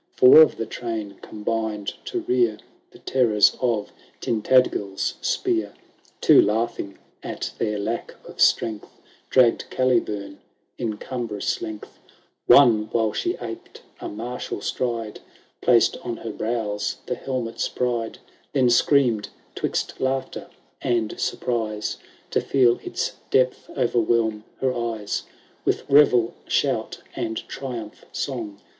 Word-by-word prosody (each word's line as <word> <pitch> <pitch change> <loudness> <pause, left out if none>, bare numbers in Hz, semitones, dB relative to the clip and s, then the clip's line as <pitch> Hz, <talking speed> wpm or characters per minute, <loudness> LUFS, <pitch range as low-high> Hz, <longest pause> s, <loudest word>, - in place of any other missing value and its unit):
Four 130 +5 +9
of 155 - +5
the 115 - -2
train 110 -3 -5
combined 110 -1 -3
to 360 - -3
rear 365 +1 +1 0.3
The 365 - -16
terrors 115 - +3
of 115 -5 0 0.3
Tintadgel^ 110 -4 +2 0.3
spear; 110 -3 0 0.2
' - - -33
Two, - - +7
laughing 110 -2 -1 0.2
at - - -5
their 105 -2 0
lack 110 +3 -3
of - - -8
strength, 110 -2 +2 0.4
DiaggM 125 -3 +3
Calibum 105 -6 0 0.4
in 110 -2 -2
cumbrous 115 -6 -3
lengUi; 110 -1 -6 0.6
One, 110 -6 +6
while 110 -2 +1
she - - -1
aped - - -8 0.2
a - - -5
martial 120 +4 -5
stride, 115 -4 -3 0.4
Placed 120 -2 +4
on 120 -1 -5
her 115 - -6
brows 110 -2 -2
the - - -2
helmet*s 125 -4 -3
pride; 120 -2 -2 0.4
Then 130 -3 +3
screamed, 120 -4 +3 0.2
'twixt - - -2
laughter 130 0 -2 0.3
and 115 -3 -1
surprise. 110 -3 -2 0.3
To - - +2
feel 125 -3 +3
its - - -3
depth 130 -1 +1
overwhelm 115 -3 +1 0.2
her 130 -1 +1
eyes. 115 -4 -3 0.4
With - - 0
revel 130 -5 +5
shout, - - 0
and 110 0 -3
triumph 120 -6 -6
song. 110 -7 -4
115 Hz, 120 wpm, -24 LUFS, 105-125 Hz, 0.6 s, Four